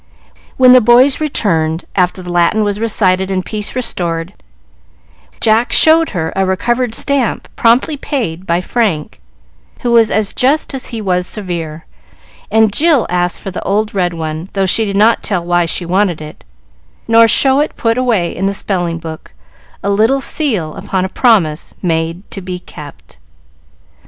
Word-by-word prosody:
When 255 -1 +6
the 255 0 +7
boys 245 +6 +4
returned, 165 - -1
after 180 0 0
the 175 - -7
Latin 175 +5 +2
was 205 0 -2
recited 190 -4 +1
and 185 -1 -2
peace 210 0 -4
restored, 170 -9 -2 1.1
Jack 225 +2 +2
showed 320 +1 +5
her 160 -4 -3
a 195 - +1
recovered 235 +5 -1
stamp 280 -5 -1
promptly 245 +6 +2
paid 190 - -4
by 170 +1 +1
Frank, 185 - -2 0.6
who 240 - -1
was 230 -2 +4
as 215 -2 0
just 280 +4 +1
as 265 - -5
he 230 -3 -6
was 180 -2 0
severe, 170 -6 -5 0.6
and 220 -1 +3
Jill 310 -4 +3
asked 180 -1 -1
for 195 - -6
the 185 - -6
old 210 +2 -1
red 180 -3 -1
one, 160 +2 -5
though 195 -1 0
she 220 +4 +2
did 200 -1 -3
not 220 +3 +3
tell 180 -5 -2
why 175 0 +1
she 175 +2 -3
wanted 185 -1 0
it, 155 0 -11 0.6
nor 230 0 +6
show 270 +4 +3
it 300 - -1
put 230 -1 0
away 230 -9 0
in 195 +2 -1
the 200 - -1
spelling 175 -5 -2
book, 160 - -9 0.5
a 200 - 0
little 220 +7 +2
seal 220 - -1
upon 190 -1 -3
a - - -4
promise 185 -10 +1
made 165 +2 -2
to 195 - -5
be 180 0 -5
kept. 65 - -13
195 Hz, 165 wpm, -14 LUFS, 175-230 Hz, 1.1 s, the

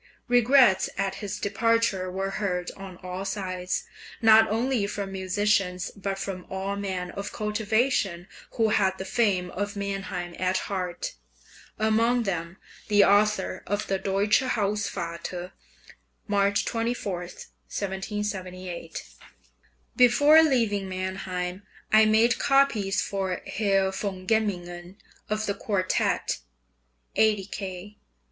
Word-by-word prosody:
Regrets 245 -4 +5
at 195 0 0
his 205 0 -4
departure 215 -3 +1
were 195 +1 -2
heard 180 -3 -2
on 195 -2 -9
all 185 +1 -4
sides, 185 -2 -3 0.4
not 220 0 +6
only 230 -1 +1
from 200 -1 -4
musicians, 190 -1 0
but 195 -1 -3
from 195 -2 -5
all 190 +1 -3
men 190 -3 -3
of 200 0 -5
cultivation 210 -3 0 0.3
who 225 -2 +2
had 190 -3 +2
the 190 - -5
fame 190 -5 +1
of 205 +1 -3
Mannheim 195 -3 -4
at 185 0 +1
heart, 180 -3 -3 0.6
among 230 +3 +2
them 175 -3 -3 0.3
the 205 -1 +5
author 205 -2 +2
of 205 +1 -1
the 195 -2 -1
"Deutsche 195 +2 +2
Hausvater" 185 -6 -2 0.8
(March 200 -1 +2
24, 230 -5 -2
1778): 185 -1 -5 0.9
Before 290 +6 +7
leaving 225 -10 +1
Mannheim 185 0 -3 0.3
I 215 0 +8
made 225 +2 +4
copies 235 -8 +2
for 190 -2 -2
Herr 195 -2 +1
von 190 -1 -4
Gemmingen 180 -4 -1 0.3
of 215 0 -1
the 200 - 0
quartet 195 -3 0 0.8
(80 210 -3 +3
K.) 195 +1 -7
200 Hz, 110 wpm, -26 LUFS, 185-215 Hz, 0.9 s, I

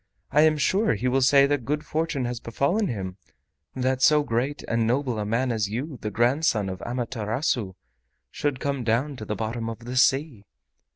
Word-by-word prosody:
I 150 - +5
am 155 0 +4
sure 195 - +2
he 115 +5 -2
will 130 +1 +2
say 140 +2 +6
that 140 -2 0
good 150 +5 -2
fortune 155 -4 -1
has 120 -1 -3
befallen 140 - 0
him, 95 -5 -4 0.6
that 130 0 0
so 150 +2 +5
great 130 +3 -2
and 115 -1 +1
noble 125 -2 0
a 105 - -2
man 125 +4 0
as 110 -4 -1
you, 130 +5 -4
the 105 - -2
grandson 120 -3 +1
of 95 0 -6
Amaterasu, 120 - -2 0.6
should 145 -3 -2
come 140 -2 -2
down 120 +6 0
to 110 - -7
the 105 - -3
bottom 115 +1 -3
of 115 +1 -8
the 125 +1 -5
sea." 135 -5 +2
125 Hz, 185 wpm, -25 LUFS, 115-145 Hz, 0.6 s, say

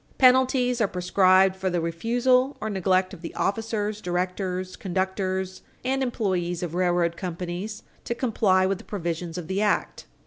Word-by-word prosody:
Penalties 255 -1 +4
are 215 - +4
prescribed 185 +1 +4
for 190 0 -2
the 175 -1 0
refusal 245 - +1
or 220 - -3
neglect 185 -1 +1
of 180 - -10
the 170 - -7
officers, 215 0 -1
directors, 185 +1 -2
conductors 190 0 -2 0.2
and 270 +1 0
employees 185 -8 -1
of 170 -2 -4
railroad 175 -1 +1
companies 180 +4 -5 0.2
to 235 - -2
comply 210 -6 +2
with 195 0 0
the - - -12
provisions 170 -4 -4
of 175 -3 -5
the 190 +3 -1
act. 210 -1 0
190 Hz, 150 wpm, -25 LUFS, 180-220 Hz, 0.2 s, Penalties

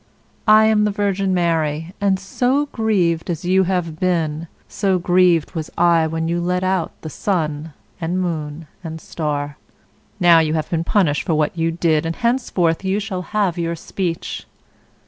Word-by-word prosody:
I 215 0 +7
am 215 -1 +3
the - - +2
Virgin 200 -1 0
Mary, 165 -2 0
and 195 -2 +2
so 250 +9 0
grieved 185 -8 0
as 170 -1 -3
you 190 +1 +3
have 175 -4 -2
been, 165 -3 0 0.2
so 195 -2 0
grieved 175 -2 +3
was 160 -2 -5
I 170 -2 +4
when 160 +1 -2
you 170 +1 -1
let 180 +1 0
out 185 -2 0 0.2
sun, 155 -3 -2 0.3
and 170 +3 -1
moon, 160 -3 -3 0.2
and 160 -1 -6
star. 145 -2 -4 0.6
Now 175 -3 +6
you 160 -1 +1
have 155 - -3
been 165 -1 0
punished 170 -6 +2
for 165 - -1
what 155 +1 0
you 165 0 0
did, 165 -2 +1
and 165 - -3
henceforth 235 -9 0
you 190 +2 0
shall 200 -3 -4
have 185 -1 -1
your 170 0 -1
speech." 170 0 -4
170 Hz, 165 wpm, -20 LUFS, 160-190 Hz, 0.6 s, I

